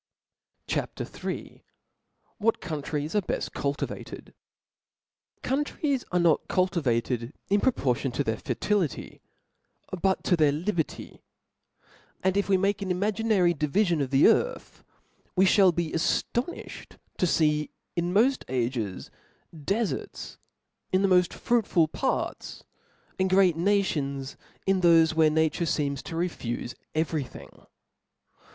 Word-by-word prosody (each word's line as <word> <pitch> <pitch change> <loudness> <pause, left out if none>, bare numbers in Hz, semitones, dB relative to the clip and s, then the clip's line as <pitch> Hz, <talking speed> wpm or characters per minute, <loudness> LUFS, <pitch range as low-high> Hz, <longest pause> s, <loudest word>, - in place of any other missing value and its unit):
CHAP. - - -3 0.3
III. - - -5 0.8
What 225 +1 +1
Countries 150 -3 -4
are 210 - +2
befi - - -3
cultivated. 140 0 -4 1.1
/Countries 280 0 -1
are 180 - +2
not 170 -3 +3
cultivated 130 - 0 0.2
in 200 +1 +3
pro 260 - +4
^^ - - -30
portion 130 0 0
to - - 0
their 110 0 -1
fertility, 190 - -2 0.8
but 190 -1 +1
to 180 - +3
their 155 -3 +4
li 165 +8 -1
berty; 160 -3 -4 1.0
and 190 0 +2
if 200 0 0
we 190 - +5
make 200 +2 0
an 195 - -3
imaginary 200 -1 +2
divifion 170 +2 +1
ef 135 - -1
the 135 +1 +5
earth, - - 0 0.5
we 190 +1 +5
fliall 190 -1 +5
be 170 -2 -1
aftonifhed 240 - -2 0.2
to 180 - +3
fee 150 -2 +2 0.3
in 175 0 -1
tnoft 255 +5 +3
ages, 120 -6 -2 0.4
deferts 195 +8 -3 0.5
in 185 +1 +2
the - - +4
moft 180 -2 +4
fruitful 205 -9 +1
parts, 260 - -3 0.6
and 190 0 +2
great 185 -3 +4
nations 155 -8 0 0.3
in 195 -1 +2
thofe, 165 -2 +5
where 160 -1 +4
nature 160 +2 +1
feems 140 -3 -1
to 165 - -7
refufe 125 -9 -3 0.2
every 155 -2 0
thing. 125 - -14
175 Hz, 125 wpm, -27 LUFS, 150-195 Hz, 1.1 s, we